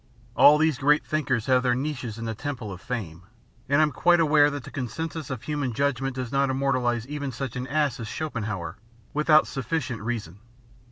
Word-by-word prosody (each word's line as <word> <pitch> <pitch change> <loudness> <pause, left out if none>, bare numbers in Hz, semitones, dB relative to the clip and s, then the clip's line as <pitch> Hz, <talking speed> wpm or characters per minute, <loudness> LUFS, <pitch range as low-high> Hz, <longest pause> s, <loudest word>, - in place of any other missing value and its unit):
All 150 +1 +8
these 155 -3 +1
great 150 +1 +3
thinkers 130 -7 -1
have 130 -1 +3
their 125 -1 +2
niches 130 -5 -4
in 115 - -5
the 115 - -2
Temple 125 -3 -5
of 90 - -10
Fame, 100 -10 -5 0.5
and 145 +2 +5
I'm 150 - +1
quite 175 +6 +3
aware 150 -2 +5
that 145 -2 -5
the - - -10
consensus 150 +5 -4
of 130 -3 -5
human 145 -5 -2
judgment 135 0 -1
does 130 -2 -4
not 140 0 +2
immortalise 130 -3 0
even 145 -1 -4
such 130 -1 -5
an 125 0 -4
ass 145 -2 0
as 115 - -5
Schopenhauer, 110 - -4 0.4
without 150 +1 +5
sufficient 135 -4 -3
reason. 105 -5 -4
135 Hz, 185 wpm, -26 LUFS, 120-150 Hz, 0.5 s, All